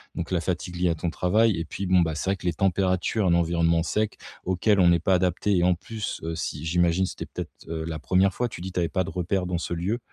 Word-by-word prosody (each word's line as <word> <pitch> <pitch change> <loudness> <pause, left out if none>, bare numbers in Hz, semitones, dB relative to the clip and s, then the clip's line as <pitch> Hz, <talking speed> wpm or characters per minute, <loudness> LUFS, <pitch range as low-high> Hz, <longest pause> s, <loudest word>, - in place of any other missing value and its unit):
donc 85 +2 -4
la 90 - +2
fatigue 90 +1 -3
liée 90 0 +2
à - - -1
ton 85 +1 -2
travail 105 +5 +2
et 85 - -3
puis 100 - -5
bon, 95 0 +4
bah, 80 -3 +1
c'est 95 - -2
vrai 100 - +2
que 90 - -12
les 85 - +1
températures, 95 +2 +1
l'environnement 85 -1 +2
sec 105 +4 -1 0.3
auquel 95 +3 +2
on 90 - +6
n'est 85 -1 +5
pas 95 +2 +3
adapté 90 +2 +1
et 85 - +2
en 90 - +4
plus, 110 +4 -5
heu, 80 0 -3
si 75 -1 -4
j'imagine, 85 +2 +2
c'était - - -6
peut-être, - - -7 0.2
heu, 80 -1 -4
la 80 -2 -4
1re 95 +7 +2
fois, 125 - -1
tu 105 - -9
dis, 95 +1 -5
tu 90 - -2
avais 85 - +1
pas 95 -1 0
de 95 - -6
repères 90 +1 -1
dans 90 -1 -1
ce 85 - -3
lieu? 95 +8 -1
90 Hz, 265 wpm, -25 LUFS, 85-95 Hz, 0.3 s, on